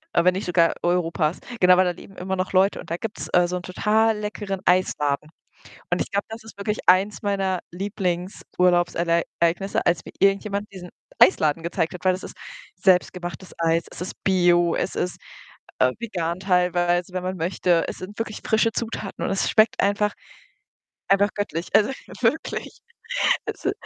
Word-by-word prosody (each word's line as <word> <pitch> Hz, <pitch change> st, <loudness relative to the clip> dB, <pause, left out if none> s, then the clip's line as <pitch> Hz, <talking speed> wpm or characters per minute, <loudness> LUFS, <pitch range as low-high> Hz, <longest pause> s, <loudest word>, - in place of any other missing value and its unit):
Äh, 170 Hz, -, +4 dB
wenn 180 Hz, 0 st, +4 dB
nicht 190 Hz, -, -4 dB
sogar 170 Hz, -2 st, +3 dB
Europas. 170 Hz, -2 st, 0 dB, 0.2 s
Genau, 180 Hz, 0 st, +6 dB
weil 185 Hz, -, +5 dB
da 180 Hz, -, +1 dB
leben 190 Hz, +2 st, -13 dB
immer 190 Hz, +1 st, -3 dB
noch 185 Hz, +1 st, -2 dB
Leute 190 Hz, +2 st, +3 dB
und -, -, -10 dB
da 170 Hz, -, -1 dB
gibt's, 220 Hz, +2 st, -6 dB
äh, 175 Hz, 0 st, +5 dB
so 180 Hz, +1 st, -2 dB
'n -, -, -6 dB
total 215 Hz, +3 st, +2 dB
leckeren 205 Hz, -2 st, -4 dB
Eisladen 150 Hz, -5 st, +1 dB, 0.6 s
und -, -, +1 dB
ich -, -, -9 dB
glaube, 200 Hz, -1 st, -1 dB
das 225 Hz, 0 st, -9 dB
ist 220 Hz, -, -13 dB
wirklich 210 Hz, +1 st, -2 dB
eins 195 Hz, +4 st, +4 dB
meiner 195 Hz, -3 st, 0 dB
Lieblingsurlaubsereignisse, 175 Hz, -1 st, 0 dB
als 175 Hz, 0 st, +2 dB
mir -, -, -10 dB
irgendjemand 200 Hz, +1 st, +1 dB
diesen 180 Hz, -2 st, -9 dB, 0.3 s
Eisladen 160 Hz, -3 st, +4 dB
gezeigt 170 Hz, 0 st, -2 dB
hat, 180 Hz, -, -9 dB
weil 185 Hz, -, +5 dB
das 185 Hz, -, -5 dB
ist -, -, -9 dB, 0.4 s
selbstgemachtes 180 Hz, -1 st, 0 dB
Eis. 165 Hz, 0 st, +1 dB
Es -, -, -8 dB
ist 185 Hz, -, -8 dB
bio, 175 Hz, -2 st, +3 dB
es -, -, -2 dB
ist, 180 Hz, -, -2 dB, 0.6 s
äh, 130 Hz, 0 st, +3 dB
vegan 175 Hz, -7 st, -3 dB
teilweise, 180 Hz, -1 st, +1 dB
wenn 185 Hz, -, -2 dB
man 185 Hz, +1 st, -3 dB
möchte. 170 Hz, 0 st, +1 dB
Es -, -, -5 dB
sind 200 Hz, +4 st, -9 dB
wirklich 220 Hz, -2 st, -4 dB
frische 220 Hz, +1 st, +2 dB
Zutaten 225 Hz, -3 st, -4 dB
und -, -, -1 dB
es 195 Hz, -, 0 dB
schmeckt 215 Hz, +1 st, +3 dB
einfach 205 Hz, +1 st, +1 dB, 1.0 s
einfach 200 Hz, +1 st, +4 dB
göttlich, 180 Hz, -4 st, -3 dB
also, 210 Hz, +4 st, +5 dB, 0.3 s
wirklich. -, -, -1 dB, 0.7 s
Es -, -, -6 dB
i -, -, +3 dB
185 Hz, 170 wpm, -23 LUFS, 175-200 Hz, 1.0 s, Genau